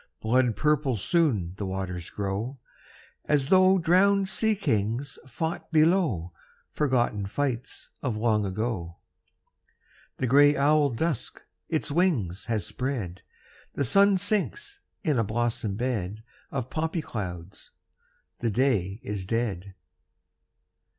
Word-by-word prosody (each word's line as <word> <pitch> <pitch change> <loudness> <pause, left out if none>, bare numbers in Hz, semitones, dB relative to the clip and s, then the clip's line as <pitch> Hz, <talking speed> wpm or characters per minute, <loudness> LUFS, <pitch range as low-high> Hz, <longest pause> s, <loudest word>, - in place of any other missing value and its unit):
Blood 120 0 +2
purple 150 -4 +1
soon 110 - +1
the 105 - -3
waters 95 -2 -4
grow, 105 +6 -3 0.7
As 145 -2 +1
though 190 0 +6
drowned 190 +3 +3
sea 220 +1 +1
kings 115 - -1
fought 160 +8 -4
below 155 - +2 0.4
Forgotten 120 -8 0
fights 125 +2 -3
of 125 -6 -2
long 110 -1 +2
ago. 95 -4 -3 1.2
The - - -1
gray 145 +3 +5
owl 145 +1 +4
Dusk 140 +3 -3 0.3
its - - -1
wings 140 - +1
has 110 -6 -1
spread; 115 -9 -4 0.5
The 140 - 0
sun 200 - +5
sinks 400 - -2 0.2
in 150 - +1
a - - +3
blossom 115 -1 -1
bed 110 -3 -3 0.3
Of 130 -3 -4
poppy 160 +1 -2
clouds; 90 -5 -6 0.7
the 120 - 0
day 105 -4 0
is 105 -6 -4
dead. 100 -3 -2
125 Hz, 115 wpm, -27 LUFS, 100-155 Hz, 1.2 s, though